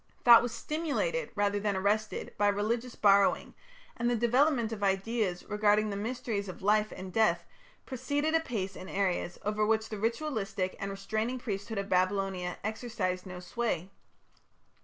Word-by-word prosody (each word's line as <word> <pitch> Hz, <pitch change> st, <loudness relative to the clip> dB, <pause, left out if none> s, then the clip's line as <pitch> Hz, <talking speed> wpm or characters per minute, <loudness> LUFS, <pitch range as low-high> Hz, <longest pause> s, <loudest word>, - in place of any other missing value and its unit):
Thought 235 Hz, -2 st, +10 dB
was 245 Hz, -, -2 dB
stimulated 330 Hz, -, -2 dB
rather 205 Hz, 0 st, +1 dB
than 205 Hz, -1 st, 0 dB
arrested 210 Hz, +3 st, -1 dB
by 205 Hz, -, +2 dB
religious 230 Hz, +4 st, -1 dB
borrowing, 200 Hz, -1 st, +3 dB, 0.4 s
and 240 Hz, +1 st, 0 dB
the 245 Hz, -, +2 dB
development 240 Hz, +1 st, +2 dB
of 220 Hz, -2 st, -5 dB
ideas 195 Hz, -1 st, 0 dB
regarding 210 Hz, 0 st, +2 dB
the -, -, -3 dB
mysteries 220 Hz, -2 st, -3 dB
of 185 Hz, -, -9 dB
life 210 Hz, +1 st, +3 dB
and 185 Hz, -1 st, -8 dB
death 170 Hz, -6 st, +2 dB, 0.4 s
proceeded 285 Hz, +4 st, -1 dB
apace 225 Hz, -, -1 dB
in 185 Hz, -, -9 dB
areas 185 Hz, -3 st, -1 dB
over 210 Hz, +1 st, 0 dB
which 220 Hz, +1 st, +1 dB
the 215 Hz, -, -5 dB
ritualistic 220 Hz, -5 st, -2 dB
and 200 Hz, -, -3 dB
restraining 215 Hz, +5 st, -2 dB
priesthood 215 Hz, -2 st, -4 dB
of 200 Hz, 0 st, -2 dB
Babylonia 185 Hz, -1 st, 0 dB
exercised 215 Hz, -5 st, -3 dB
no 180 Hz, -1 st, -7 dB
sway. 185 Hz, -1 st, -3 dB
210 Hz, 150 wpm, -30 LUFS, 195-235 Hz, 0.4 s, Thought